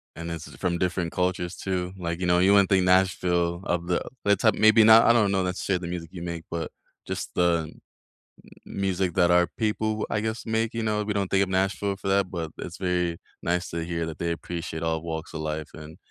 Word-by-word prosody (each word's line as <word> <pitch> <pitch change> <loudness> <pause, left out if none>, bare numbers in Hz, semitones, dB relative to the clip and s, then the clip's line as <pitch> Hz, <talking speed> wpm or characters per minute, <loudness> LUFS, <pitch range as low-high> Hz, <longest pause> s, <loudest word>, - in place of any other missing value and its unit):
And 85 +1 -6
this 85 -2 -6
is - - -13
from 85 -2 -1
different 90 -2 -1
cultures 90 0 -1
too, 90 -2 -3
like, 85 -2 -3
you 90 - -1
know, 90 - +4
you 95 +2 +5
wouldn't 100 -2 +5
think 95 -2 +4
Nashville 90 -2 +2
of 85 0 -1
the 90 - +1 0.2
that's 100 0 +2
how 110 - +6
maybe 110 +1 +6
not 110 +1 +8
I 115 - +6
don't 105 -4 +3
know 95 -1 +1
not 90 0 -2
to - - -5
share 95 -2 0
the 90 - -6
music 85 -2 -5
you 85 - -7
make, 85 -1 -5
but 85 -1 -3 0.4
just - - -4
the 85 -2 +2
n - - -21 0.9
mu - - -11
music 95 -2 0
that 90 -1 +3
our 90 0 +5
people, 110 -1 -1
I 105 - 0
guess, 110 +1 -3
make, 115 0 -1
you 115 - -2
know, 105 -1 0
we 105 - -1
don't 100 -2 -1
think 100 0 +3
of - - -9
Nashville 95 +1 0
for 95 - -6
that, 95 -1 +2
but 80 -3 -4
it's 85 - -7
very 90 -2 -1 0.2
nice 90 +1 -1
to 85 0 -3
hear 85 -1 -2
that 80 -2 -7
they 85 0 -1
appreciate 85 -1 -5
all 80 -1 0
walks 80 -1 -5
of - - -5
life 80 0 -3
and 80 +1 -10
90 Hz, 240 wpm, -26 LUFS, 85-100 Hz, 0.9 s, not